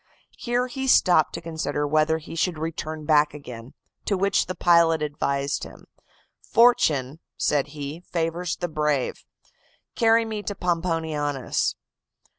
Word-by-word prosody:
"Here 245 +1 0
he 265 +1 -4
stopped 180 -10 +4
to - - -5
consider 155 -3 -3
whether 155 +2 +2
he 160 - -10
should 165 0 -1
return 155 -1 -5
back 150 -1 +3
again; 125 -4 -10 0.3
to 200 - 0
which 200 +1 +1
the 185 - -4
pilot 165 -2 +4
advised 140 -1 -2
him. - - -11 0.6
'Fortune,' 155 - +3 0.2
said 145 -1 +1
he, 145 +3 -5
'favors 170 0 -2
the 175 - -3
brave; 150 -4 -1 0.7
carry 230 -1 +3
me 215 -1 -4
to 205 0 -5
Pomponianus. 160 -6 -1
160 Hz, 130 wpm, -24 LUFS, 150-180 Hz, 0.7 s, stopped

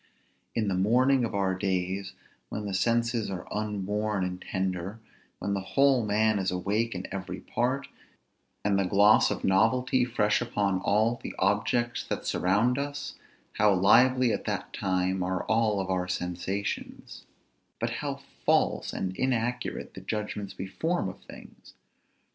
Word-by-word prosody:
In 110 -2 +1
the 100 - +1
morning 125 +8 +3
of 110 - -4
our 95 -1 +1
days, 95 +1 -2 0.4
when 105 - -4
the 100 - -3
senses 115 +3 +1
are 95 -2 -5
unworn 105 -1 -1
and 90 0 -4
tender, 95 +2 -3 0.4
when 100 - -2
the 100 - 0
whole 135 +5 +3
man 105 0 +2
is 95 -1 0
awake 100 +5 -1
in 90 - -4
every 95 -1 -5
part, 130 +3 -1 0.8
and 100 -1 +3
the - - +3
gloss 100 +3 +5
of - - -3
novelty 125 +6 +3
fresh 110 -4 +1
upon 100 -5 0
all 110 +5 +2
the - - -6
objects 110 +5 +1
that - - -3
surround 110 +8 +2
us, 145 0 -4 0.5
how 105 -1 +5
lively 125 +6 +5
at - - -3
that - - -3
time 95 0 0
are 90 0 -1
our 100 -5 +1
sensations, 90 +3 -4 0.5
but - - -1
how - - -4 0.2
false - - +2
and 95 0 -3
inaccurate 125 -1 -1
the - - -9
judgments 105 -2 -4
we 95 - -4
form 160 - -1
of 95 - -10
things! - - -14
105 Hz, 145 wpm, -28 LUFS, 95-115 Hz, 0.8 s, gloss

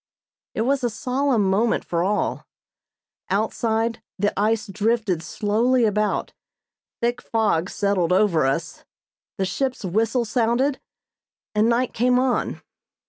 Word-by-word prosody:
It - - 0
was 270 +3 +1
a 240 - +2
solemn 250 -1 0
moment 210 +5 +1
for 170 0 0
all. 205 +3 -1 0.8
Outside 225 +3 0 0.2
the 205 +1 +1
ice 215 +2 +1
drifted 210 -3 0
slowly 225 +8 +1
about, 210 0 0 0.7
thick 240 +1 0
fog 205 -6 0
settled 200 -4 0
over 180 -7 +3
us, 135 +5 -3 0.5
the 195 - 0
ship's 250 +4 -2
whistle 225 +6 +1
sounded, 240 +4 +1 0.7
and 215 +2 +3
night 240 +1 +1
came 250 +2 +2
on. 255 0 0
220 Hz, 120 wpm, -23 LUFS, 200-240 Hz, 0.8 s, over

